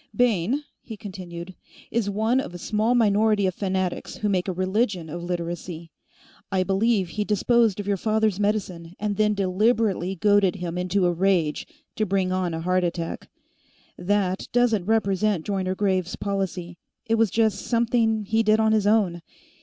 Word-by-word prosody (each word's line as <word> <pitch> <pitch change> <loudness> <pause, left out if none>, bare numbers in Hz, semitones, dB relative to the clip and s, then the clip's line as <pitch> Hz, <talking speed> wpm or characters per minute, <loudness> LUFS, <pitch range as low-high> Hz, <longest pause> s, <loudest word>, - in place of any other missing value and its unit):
"Bayne," 245 - +1 0.2
he 220 - -9
continued, 185 -3 -8 0.4
"is 225 -3 0
one 220 +5 +1
of 180 - -5
a - - -4
small 215 +6 0
minority 215 -2 +3
of 185 - 0
fanatics 190 -1 -2
who 210 - -2
make 185 -2 0
a - - 0
religion 185 -2 -1
of 170 +2 -5
Literacy. 170 -1 -5 0.6
I 190 -1 +2
believe 195 0 +1
he 210 +4 -2
disposed 215 0 +2
of 205 - -4
your 200 -1 +1
father's 215 -1 +1
medicine, 185 -5 -2
and 210 -1 -1
then 210 0 +2
deliberately 195 -1 +1
goaded 205 0 +3
him 175 -2 -5
into 180 +1 0
a 175 - +2
rage 175 -4 +1 0.3
to 215 -1 0
bring 190 -1 0
on 185 -3 -1
a 160 - -4
heart 180 +1 +1
attack. 170 -1 -4 0.7
That 190 0 -1
doesn't 230 -6 +2
represent 205 -4 +1
Joyner 190 -2 -1
Graves 185 -3 0
policy; 185 -3 -3 0.3
it 225 - 0
was 225 -1 +3
just 220 -1 +1
something 230 -2 +1
he 220 +3 +2
did 215 0 +3
on 220 0 +3
his 215 -2 +2
own. 200 -6 +2
195 Hz, 165 wpm, -24 LUFS, 180-215 Hz, 0.7 s, minority